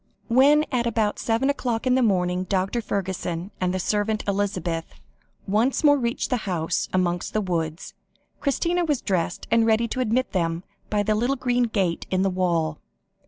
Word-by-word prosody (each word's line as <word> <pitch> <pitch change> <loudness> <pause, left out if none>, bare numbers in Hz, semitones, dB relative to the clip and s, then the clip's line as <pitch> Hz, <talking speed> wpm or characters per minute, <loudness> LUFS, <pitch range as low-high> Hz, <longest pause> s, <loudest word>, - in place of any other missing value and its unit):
When 285 +5 +5
at 240 -3 +1
about 215 -2 0
seven 230 +4 +1
o'clock 245 -4 -2
in 255 - +3
the 260 - +3
morning, 180 -4 +1
Dr. 195 +5 0
Fergusson, 190 -3 -3
and 180 -1 +1
the 185 - -1
servant 210 +3 0
Elizabeth, 185 -5 -2 0.5
once 225 +10 +1
more 290 -1 +5
reached 235 -1 -2
the 250 - +3
house 165 -3 -1
amongst 175 -1 0
the 215 - +2
woods, 165 -3 -3 0.5
Christina 340 +6 0
was 295 -6 0
dressed 180 -3 -2
and 230 0 +4
ready 225 +1 +2
to 255 - -3
admit 255 +1 0
them 165 -2 -1 0.3
by 205 -1 +1
the 215 +1 +1
little 240 +6 +1
green 245 -2 +1
gate 195 -7 -1
in 185 0 +1
the 195 - +1
wall. 170 -4 0
205 Hz, 170 wpm, -24 LUFS, 180-240 Hz, 0.5 s, When